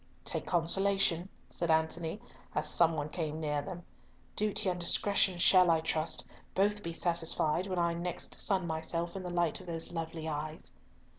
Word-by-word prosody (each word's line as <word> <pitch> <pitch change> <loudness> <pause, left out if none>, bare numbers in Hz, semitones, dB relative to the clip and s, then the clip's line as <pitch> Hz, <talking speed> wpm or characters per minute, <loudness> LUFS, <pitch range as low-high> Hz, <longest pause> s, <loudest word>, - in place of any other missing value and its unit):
"Take - - -2
consolation," 180 +1 +2 0.2
said 170 - -3
Antony, 160 +1 +1
and 210 - -10 0.3
as - - +1
some 165 -1 +4
one 150 -1 -3
came 155 -2 -3
near 150 -2 -1
them, 175 +1 -8 0.5
"Duty 210 -1 +1
and 180 -1 0
discretion 190 +1 +3
shall, 185 0 +6
I 165 -1 +4
trust, 160 0 -1 0.3
both 205 +2 +2
be 170 - -4
satisfied 170 0 0
when 185 -2 -3
I 170 -1 +2
next 175 +1 -4
sun 190 -4 +1
myself 165 +2 -2
in 195 - -4
the 180 - -5
light 175 -2 0
of 185 - -14
those 165 -1 -3
lovely 160 -1 -4
eyes." 155 +1 -5
170 Hz, 170 wpm, -32 LUFS, 160-185 Hz, 0.5 s, shall